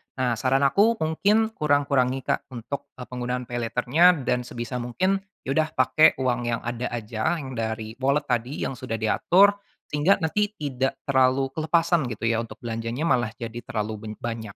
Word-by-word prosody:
Nah, 125 -3 0
saran 135 +1 +2
aku 205 +11 +4
mungkin 210 +8 +2
kurang-kurangi, 140 - +1
Kak, - - -1
untuk, 140 +5 -6
eee, 125 - -8
penggunaan 125 0 -4
paylater-nya 125 +9 +3
dan 125 0 -1
sebisa 120 +1 -5
mungkin, 185 +12 0 0.2
ya 135 - -3
udah 155 +2 +1
pakai 155 +1 +5
uang 120 -1 +1
yang 115 -1 -1
ada 120 +1 -3
aja, 115 +5 -2
yang 135 -5 -6
dari 110 0 -4
wallet 140 +2 +2
tadi, 120 +4 -1
yang - - -1
sudah 115 -3 -5
diatur, 180 - +4 0.4
sehingga 150 +7 +4
nanti 210 +6 0
tidak 135 -3 -3
terlalu 130 0 +2
kelepasan 165 -1 +1
gitu 115 -1 -7
ya, 115 - +1
untuk 115 -1 -6
belanjanya 115 +4 -3
malah 125 -8 +1
jadi 115 -1 -6
terlalu 110 -1 -4
ben 105 - -5
banyak. 115 -2 -4
130 Hz, 170 wpm, -25 LUFS, 115-155 Hz, 0.4 s, pakai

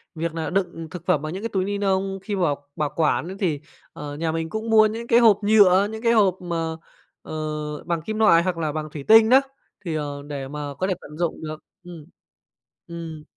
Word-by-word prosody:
việc 165 0 -3
nà 160 -1 -3
đựng 175 -3 -2
thực 180 -2 -8
phẩm 170 -6 +2
bằng 155 +2 -5
những 190 - -5
cái 230 - -2
túi 190 -2 -1
ni 205 0 -2
nông 195 -1 0
khi 205 -2 -3
bảo 145 -6 -1
bảo 150 -1 -1
quản 160 +1 +1
ấy 190 +1 -7
thì, 155 -7 -1 0.3
ờ, 145 -1 -7
nhà 160 0 -1
mình 165 0 -3
cũng 220 +1 -4
mua 220 -1 +6
những 225 +2 -3
cái 235 0 +5
hộp 220 -4 +5
nhựa, 205 -2 +5
những 220 0 -7
cái 230 0 +4
hộp 195 -4 +3
mà, 165 -2 -3 0.5
ờ, 155 - -8 0.5
bằng 170 -2 -2
kim 215 +5 -4
loại 170 -6 +5
hoặc 180 -2 -1
là 155 -2 -1
bằng 155 0 -4
thủy 145 -3 -6
tinh 220 0 +7
đó, 265 +2 +7 0.4
thì, 160 -2 -2
ờ, 145 -1 -4
để 140 -2 -5
mà 145 0 -6
có 185 - 0
thể 190 - +1
tận 150 +1 -11
dụng 170 -2 -2
được 155 0 -7 0.2
ừm, 170 -4 -11 0.8
ừm. 165 -2 -7
170 Hz, 230 wpm, -23 LUFS, 155-200 Hz, 0.8 s, tinh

